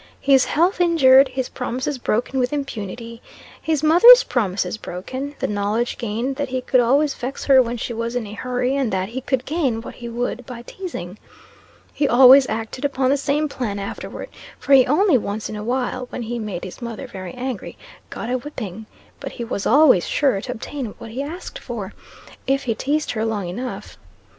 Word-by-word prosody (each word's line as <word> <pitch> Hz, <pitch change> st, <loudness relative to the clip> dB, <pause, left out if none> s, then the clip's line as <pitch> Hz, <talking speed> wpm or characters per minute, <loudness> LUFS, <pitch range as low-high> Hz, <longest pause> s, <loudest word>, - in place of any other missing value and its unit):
His 270 Hz, -2 st, +4 dB
health 355 Hz, +5 st, +1 dB
injured 275 Hz, -6 st, +6 dB
his 260 Hz, -1 st, -3 dB
promises 255 Hz, +2 st, -3 dB
broken 245 Hz, +3 st, -1 dB
with 250 Hz, 0 st, 0 dB
impunity 230 Hz, -4 st, -5 dB, 0.4 s
his 310 Hz, -2 st, -1 dB
mother's 465 Hz, +11 st, +8 dB
promises 200 Hz, -5 st, -1 dB
broken 260 Hz, +9 st, -6 dB
the -, -, -2 dB
knowledge 210 Hz, +3 st, -1 dB
gained 235 Hz, +4 st, -3 dB
that 285 Hz, -2 st, -2 dB
he 260 Hz, 0 st, -1 dB
could 255 Hz, 0 st, +2 dB
always 275 Hz, +5 st, +3 dB
vex 255 Hz, +3 st, -6 dB
her 270 Hz, -2 st, +7 dB
when 240 Hz, 0 st, -2 dB
she 235 Hz, -, -4 dB
was 230 Hz, +1 st, -3 dB
in 245 Hz, -3 st, -1 dB
a 205 Hz, -, -9 dB
hurry 250 Hz, +4 st, -1 dB
and 270 Hz, -5 st, 0 dB
that 190 Hz, +1 st, -1 dB
he 255 Hz, +3 st, -5 dB
could 260 Hz, -1 st, -1 dB
gain 280 Hz, -8 st, 0 dB
what 225 Hz, -, -8 dB
he 235 Hz, -1 st, -8 dB
would 245 Hz, +1 st, -3 dB
by 240 Hz, -2 st, -8 dB
teasing. 215 Hz, -, -7 dB, 0.7 s
He 290 Hz, -, +1 dB
always 260 Hz, +2 st, +7 dB
acted 225 Hz, +4 st, -4 dB
upon 270 Hz, -2 st, +1 dB
the -, -, +4 dB
same 285 Hz, +2 st, 0 dB
plan 235 Hz, -8 st, -4 dB
afterward; 200 Hz, 0 st, -6 dB, 0.3 s
for 280 Hz, -, 0 dB
he 260 Hz, -2 st, +7 dB
only 310 Hz, 0 st, +4 dB
once 210 Hz, +1 st, -4 dB
in 215 Hz, -, -6 dB
a 210 Hz, -, -5 dB
while 250 Hz, +1 st, -2 dB
(when 245 Hz, -, -5 dB
he 235 Hz, +1 st, -4 dB
made 205 Hz, -5 st, -5 dB
his 185 Hz, +6 st, -8 dB
mother 235 Hz, +1 st, -6 dB
very 185 Hz, -7 st, -8 dB
angry) 250 Hz, -3 st, -5 dB, 0.3 s
got -, -, -6 dB
a 255 Hz, +1 st, -1 dB
whipping; 220 Hz, -7 st, -7 dB, 0.3 s
but -, -, -7 dB
he 240 Hz, -, -5 dB
was 215 Hz, -3 st, -3 dB
always 270 Hz, -, +5 dB
sure 265 Hz, -9 st, +1 dB
to -, -, -5 dB
obtain 245 Hz, -1 st, -6 dB
what 225 Hz, -, -10 dB
he 255 Hz, +4 st, -4 dB
asked 320 Hz, +6 st, -7 dB
for, -, -, -6 dB, 0.5 s
if 275 Hz, 0 st, +1 dB
he 235 Hz, -, 0 dB
teased 295 Hz, +6 st, -1 dB
her 220 Hz, -2 st, -2 dB
long 215 Hz, -4 st, -2 dB
enough. 245 Hz, +9 st, -6 dB
250 Hz, 195 wpm, -21 LUFS, 225-275 Hz, 0.7 s, mother's